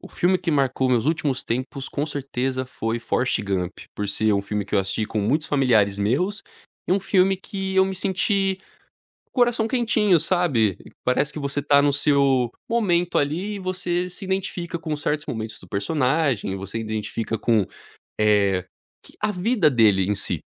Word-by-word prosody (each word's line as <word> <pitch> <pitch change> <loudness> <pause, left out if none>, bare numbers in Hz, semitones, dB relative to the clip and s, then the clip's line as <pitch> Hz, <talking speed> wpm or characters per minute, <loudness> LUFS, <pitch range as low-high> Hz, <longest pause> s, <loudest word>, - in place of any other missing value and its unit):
O - - -11
filme 185 +1 +1
que 170 - -2
marcou 135 -3 +1
meus 120 -3 +2
últimos 155 -5 0
tempos 130 +3 -3
com 145 - -2
certeza 130 -2 -2
foi 115 -2 -3
Forest 125 +1 0
Gump, 95 -2 -2 0.2
por 105 -1 -3
ser 110 +2 +2
um 100 0 +1
filme 105 0 -3
que 100 - -5
eu - - +4
assisti 95 +3 -1
com 110 - -3
muitos 150 +10 0
familiares 110 -8 +3
meus, 160 - 0 0.5
e - - +3
um 195 - +2
filme 195 0 +3
que 195 0 -5
eu 190 - +6
me 190 0 -3
senti 195 +1 0 0.7
coração 240 -3 +2
quentinho, 220 -6 +2
sabe. 150 - +2 0.3
Parece 125 +4 +1
que - - -6
você 140 0 -2
tá 140 0 +5
no 145 -1 +3
seu 140 -4 +2 0.2
momento 180 -7 +1
ali 175 +9 -1
e - - -5
você 180 -1 -2
se 195 - -6
identifica 185 -2 -3
com 155 -2 -3
certos 150 0 -2
momentos 110 -2 -5
do 95 - -15
personagem, 130 - 0
você 100 +3 -5
identifica 110 0 -3
com, 110 -3 +2 0.6
eh, 100 -3 +3 0.4
q - - -17
a 210 0 +1
vida 185 -3 +2
dele 105 -6 +4
em 105 - +2
si. 95 - -1
140 Hz, 175 wpm, -23 LUFS, 110-180 Hz, 0.7 s, eu